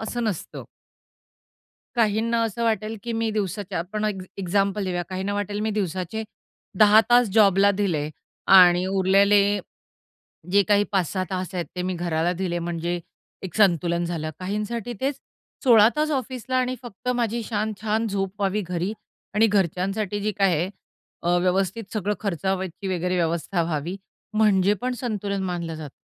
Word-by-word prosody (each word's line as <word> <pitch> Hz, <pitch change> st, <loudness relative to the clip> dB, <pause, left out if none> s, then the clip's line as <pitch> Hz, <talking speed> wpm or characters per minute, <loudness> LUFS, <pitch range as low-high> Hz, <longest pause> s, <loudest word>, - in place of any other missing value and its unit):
असं 235 Hz, +2 st, -3 dB
नसतं. 205 Hz, -7 st, -4 dB, 1.3 s
काहींना 230 Hz, +1 st, +2 dB
असं 225 Hz, +1 st, -3 dB
वाटेल, 220 Hz, 0 st, 0 dB
की 235 Hz, -, -4 dB
मी 225 Hz, 0 st, 0 dB
दिवसाच्या 205 Hz, -3 st, -3 dB
आपण 210 Hz, +5 st, -3 dB
एक 200 Hz, -3 st, -2 dB, 0.2 s
एक्झाम्पल 195 Hz, +2 st, 0 dB
देऊया. 180 Hz, -1 st, -1 dB
काहींना 190 Hz, +2 st, -3 dB
वाटेल, 205 Hz, 0 st, -2 dB
मी 220 Hz, 0 st, 0 dB
दिवसाचे 190 Hz, +1 st, -2 dB, 0.6 s
10 215 Hz, 0 st, +8 dB
तास 240 Hz, -2 st, +6 dB
जॉबला 200 Hz, -2 st, +5 dB
दिले 160 Hz, -7 st, 0 dB, 0.5 s
आणि 180 Hz, 0 st, +7 dB
उरलेले 195 Hz, +2 st, +4 dB, 1.1 s
जे 200 Hz, +1 st, +6 dB
काही 205 Hz, 0 st, +4 dB
5-6 185 Hz, 0 st, 0 dB
तास 185 Hz, 0 st, -3 dB
आहेत 175 Hz, -3 st, -2 dB
ते 180 Hz, -, -1 dB
मी 185 Hz, 0 st, -2 dB
घराला 170 Hz, 0 st, 0 dB
दिले, 180 Hz, -1 st, -2 dB
म्हणजे 170 Hz, 0 st, -3 dB, 0.4 s
एक 180 Hz, -4 st, -7 dB
संतुलन 175 Hz, -4 st, +3 dB
झालं. 165 Hz, -2 st, -3 dB
काहींसाठी 210 Hz, +5 st, -3 dB
तेच 275 Hz, +1 st, -1 dB, 0.5 s
16 225 Hz, -4 st, +7 dB
तास 305 Hz, +1 st, +1 dB
ऑफिसला 260 Hz, -2 st, -2 dB
आणि 255 Hz, 0 st, +1 dB
फक्त 240 Hz, 0 st, -8 dB
माझी 235 Hz, -1 st, -1 dB
छान-छान 215 Hz, +1 st, -1 dB
झोप 195 Hz, -1 st, -1 dB
व्हावी 200 Hz, +1 st, 0 dB
घरी 180 Hz, +3 st, -2 dB, 0.4 s
आणि 220 Hz, +2 st, +5 dB
घरच्यांसाठी 195 Hz, +1 st, 0 dB
जी 215 Hz, +1 st, -1 dB
काय 195 Hz, -3 st, +4 dB
आहे 175 Hz, +5 st, -1 dB, 0.5 s
अ, 175 Hz, +1 st, +2 dB
व्यवस्थित 190 Hz, +4 st, 0 dB
सगळं 210 Hz, -1 st, -1 dB
खर्चावायची 190 Hz, -1 st, -2 dB
वगैरे 180 Hz, +1 st, -1 dB
व्यवस्था 170 Hz, +1 st, 0 dB
व्हावी 165 Hz, +2 st, -3 dB, 0.4 s
म्हणजे 205 Hz, -2 st, +4 dB
पण 255 Hz, 0 st, -1 dB
संतुलन 205 Hz, -5 st, -2 dB
मानलं 175 Hz, -3 st, -3 dB
जातं. 155 Hz, -3 st, -8 dB
195 Hz, 145 wpm, -24 LUFS, 180-215 Hz, 1.3 s, 10